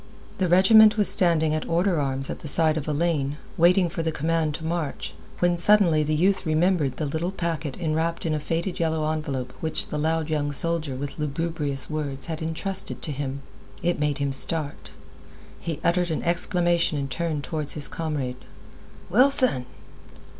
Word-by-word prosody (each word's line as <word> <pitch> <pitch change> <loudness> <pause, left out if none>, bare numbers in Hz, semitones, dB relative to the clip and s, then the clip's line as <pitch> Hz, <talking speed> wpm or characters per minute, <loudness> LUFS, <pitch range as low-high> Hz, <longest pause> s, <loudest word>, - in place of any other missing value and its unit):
The 185 - +1
regiment 215 +5 +6
was 210 - +2
standing 160 -4 +3
at 155 - -3
order 175 0 +1
arms 135 -1 -2
at - - -7
the - - -9
side 155 +2 +4
of 155 -2 -4
a - - 0
lane, 150 -2 -1 0.2
waiting 180 +2 +4
for 165 - -4
the 160 0 -1
command 160 0 -1
to 160 - -7
march, 160 - -4 0.2
when 175 -1 +1
suddenly 175 -5 +6
the 155 +1 0
youth 190 +5 +2
remembered 155 -4 +1
the 155 - -2
little 160 +5 -2
packet 165 -6 -4
enwrapped 165 0 -2
in 160 - 0
a 155 - -1
faded 170 +4 -3
yellow 160 -2 0
envelope 140 -5 -4
which 160 -1 -2
the 150 - -3
loud 160 0 -1
young 150 -2 -1
soldier 160 -2 -2
with 145 +3 -6
lugubrious 150 -2 -2
words 145 -3 -4
had 160 -2 -5
intrusted 165 +4 -4
to 155 - -2
him. 140 -1 -5 0.4
It 175 -2 0
made 150 -1 0
him 140 -1 -1
start. 145 +2 0 0.7
He 165 -4 -5
uttered 175 +1 +1
an 160 - -3
exclamation 170 -2 +1
and 140 -1 -3
turned 155 0 -3
toward 155 -3 -4
his 145 -3 -3
comrade. 145 -6 -4 0.7
"Wilson!" 250 - +5
160 Hz, 175 wpm, -24 LUFS, 150-170 Hz, 0.7 s, regiment